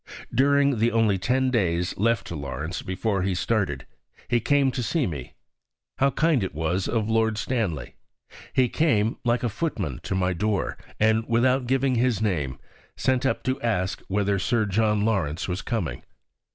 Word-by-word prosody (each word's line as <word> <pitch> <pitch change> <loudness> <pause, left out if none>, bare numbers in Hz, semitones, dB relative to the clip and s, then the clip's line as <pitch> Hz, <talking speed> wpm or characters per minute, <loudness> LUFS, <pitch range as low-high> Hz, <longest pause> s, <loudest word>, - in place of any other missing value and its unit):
During 140 0 +3
the 115 +2 +3
only 110 -4 +2
ten 130 +6 +1
days 90 -7 0
left 115 +1 +1
to 85 - -6
Lawrence 75 +4 -4
before 95 +1 -1
he 95 0 0
started, 105 +1 -1 0.4
he 120 +1 +2
came 140 +3 +2
to 125 - -3
see 145 +4 0
me. 70 -8 -6 0.6
How 135 - +4
kind 150 -5 +2
it 95 - -4
was 80 +4 -1
of 110 -3 0
Lord 110 -1 +1
Stanley. 110 - -2 0.6
He 130 -1 +3
came 115 -8 +1
like 120 0 +1
a - - +2
footman 105 - -3
to - - -3
my 95 0 +1
door, 100 +3 -1 0.2
and, 110 +1 +3
without 125 +2 +2
giving 135 +1 +2
his 120 -3 +2
name, 75 -12 -1 0.4
sent 130 +1 +1
up - - -1
to 130 +1 -1
ask 95 -7 -1
whether 100 0 +1
Sir 110 +4 +1
John 105 +1 +1
Lawrence 90 -8 0
was 90 +2 -2
coming. 95 - -3
110 Hz, 165 wpm, -25 LUFS, 95-125 Hz, 0.6 s, How